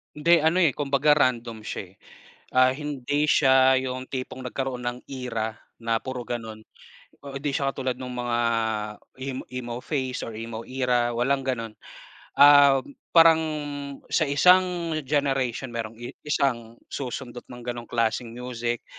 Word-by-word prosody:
Hindi 165 Hz, +3 st, +3 dB
ano, 160 Hz, +3 st, +2 dB
eh, 155 Hz, -, +4 dB
kumbaga 145 Hz, +2 st, +2 dB
random 120 Hz, -5 st, 0 dB
siya, -, -, -4 dB
eh. 95 Hz, -, -27 dB, 0.6 s
Ah, 130 Hz, 0 st, +5 dB
hindi 145 Hz, 0 st, -2 dB
siya 130 Hz, -1 st, +5 dB
yung 130 Hz, 0 st, -5 dB
tipong 130 Hz, 0 st, -5 dB
nagkaroon 125 Hz, 0 st, -4 dB
ng 120 Hz, 0 st, -3 dB
era 115 Hz, -4 st, -4 dB, 0.3 s
na 115 Hz, 0 st, 0 dB
puro 125 Hz, 0 st, -5 dB
ganon, 110 Hz, -3 st, -5 dB, 0.6 s
ah 140 Hz, -1 st, -9 dB
hindi 140 Hz, +1 st, -2 dB
siya 135 Hz, 0 st, -1 dB
katulad 130 Hz, -2 st, -2 dB
nung 125 Hz, -1 st, -6 dB
mga 120 Hz, -1 st, -1 dB, 0.8 s
em 130 Hz, 0 st, -4 dB
emo 125 Hz, -1 st, -5 dB
face 130 Hz, -4 st, -2 dB
or 115 Hz, -, -5 dB
emo 115 Hz, 0 st, -6 dB
era, 125 Hz, -2 st, 0 dB
walang 135 Hz, +3 st, 0 dB
ganon. 115 Hz, -4 st, -3 dB, 0.7 s
Um, 140 Hz, -1 st, +7 dB, 0.2 s
parang 165 Hz, -1 st, +7 dB, 0.7 s
sa 160 Hz, -, +3 dB
isang 175 Hz, +2 st, +4 dB
generation 135 Hz, -3 st, -1 dB
merong 115 Hz, -1 st, -5 dB
i 120 Hz, -, -8 dB
isang 120 Hz, -6 st, -1 dB
susundot 125 Hz, -2 st, -6 dB
ng 120 Hz, -1 st, -10 dB
ganong 120 Hz, -1 st, -5 dB
klaseng 115 Hz, 0 st, 0 dB
music, 120 Hz, -1 st, -4 dB
130 Hz, 140 wpm, -25 LUFS, 120-140 Hz, 0.8 s, Um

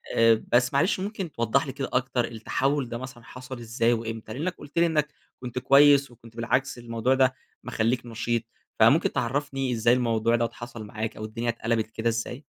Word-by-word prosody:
آآ، 115 Hz, -1 st, +4 dB
بس 125 Hz, +2 st, +3 dB
معلش، 175 Hz, +8 st, +2 dB
ممكن 195 Hz, -3 st, -4 dB
توضح 120 Hz, +2 st, +1 dB
لي 135 Hz, -, -3 dB
كده 135 Hz, -, -4 dB
أكتر، 125 Hz, -1 st, +1 dB
التحول 130 Hz, +4 st, -1 dB
ده 115 Hz, -, -4 dB
مثلًا 130 Hz, -1 st, -9 dB
حصل 130 Hz, +1 st, -9 dB
إزاي 115 Hz, 0 st, +1 dB
وإمتى؟ 115 Hz, -1 st, -5 dB
لإنَّك 165 Hz, +8 st, -3 dB
قُلت 145 Hz, -, -12 dB
لي 170 Hz, -, +5 dB
إنَّك 155 Hz, -2 st, +1 dB, 0.3 s
كنت 125 Hz, 0 st, -4 dB
كويِس، 140 Hz, +1 st, +5 dB
وكنت 115 Hz, -1 st, -17 dB
بالعكس 125 Hz, +3 st, 0 dB
الموضوع 120 Hz, +2 st, 0 dB
ده 130 Hz, -1 st, +3 dB, 0.3 s
مخلِّيك 120 Hz, +2 st, -1 dB
نشيط. 115 Hz, 0 st, -2 dB, 0.4 s
فممكن -, -, +5 dB
تعرّفني 135 Hz, +1 st, -1 dB
إزاي 115 Hz, +1 st, +3 dB
الموضوع 115 Hz, -2 st, +2 dB
دوّة 115 Hz, -1 st, 0 dB
حصل 120 Hz, -2 st, -8 dB
معاك، 110 Hz, +1 st, -5 dB
أو 110 Hz, -, -5 dB
الدنيا 115 Hz, +2 st, -3 dB
اتقلَبِت 115 Hz, -1 st, -1 dB
كده 110 Hz, +1 st, -1 dB
إزاي؟ 115 Hz, +4 st, -4 dB
120 Hz, 180 wpm, -26 LUFS, 115-135 Hz, 0.4 s, لي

